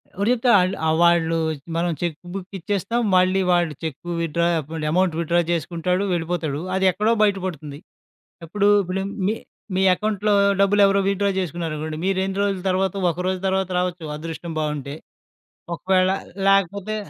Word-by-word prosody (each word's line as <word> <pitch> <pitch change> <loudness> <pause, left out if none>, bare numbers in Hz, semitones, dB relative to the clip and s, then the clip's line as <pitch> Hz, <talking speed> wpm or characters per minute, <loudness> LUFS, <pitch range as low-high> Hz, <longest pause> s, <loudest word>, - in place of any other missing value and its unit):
ఎవరు 200 +4 0
చెప్తారు 240 -2 +3
ఆళ్ళు 185 +1 +1
ఆ! - - +3
వాళ్ళు 170 -1 +3 0.4
మనం 170 +1 0
చెక్ 170 -3 -1 0.2
బుక్ 195 -2 -6
ఇచ్చేస్తాం. 205 +6 -1
మళ్ళీ 185 +1 +3
వాళ్ళు 175 -3 +2
చెక్కు 160 +2 -5
విత్‌డ్రా 170 +1 0
ఒకవేళ 155 +1 -6
అమౌంట్ 180 -1 +2
విత్‌డ్రా 170 +1 +2
జేసుకుంటాడు, 175 +3 -1
వెళ్ళిపోతాడు. 165 -3 -2
అదేక్కడో 190 +4 +2
బయట 200 -2 +3
పడుతుంది. 150 -4 -6 0.7
ఏప్పుడు 205 +4 0 0.2
ఇప్పుడు 185 +2 -3 0.2
మీ 220 - +1 0.4
మీ 190 - +2
అకౌంట్‌లో 210 +1 0 0.3
డబ్బులెవరో 200 0 +4
విత్‌డ్రా 200 0 +1
జేసుకున్నారనుకోండి, 160 -3 -4
మీరు 195 -1 +1
ఎన్ని 195 0 -4
రోజుల 195 -2 -1
తర్వాత 190 0 +1 0.2
ఒక 165 - -9
రోజు 185 -1 -1
తర్వాత 190 0 0
రావచ్చు 175 -4 -3
అదృష్టం 165 +1 -6
బావుంటే. 150 -2 -3 0.8
ఒకవేళలేకపోతే 195 +3 +1
180 Hz, 140 wpm, -22 LUFS, 165-195 Hz, 0.8 s, డబ్బులెవరో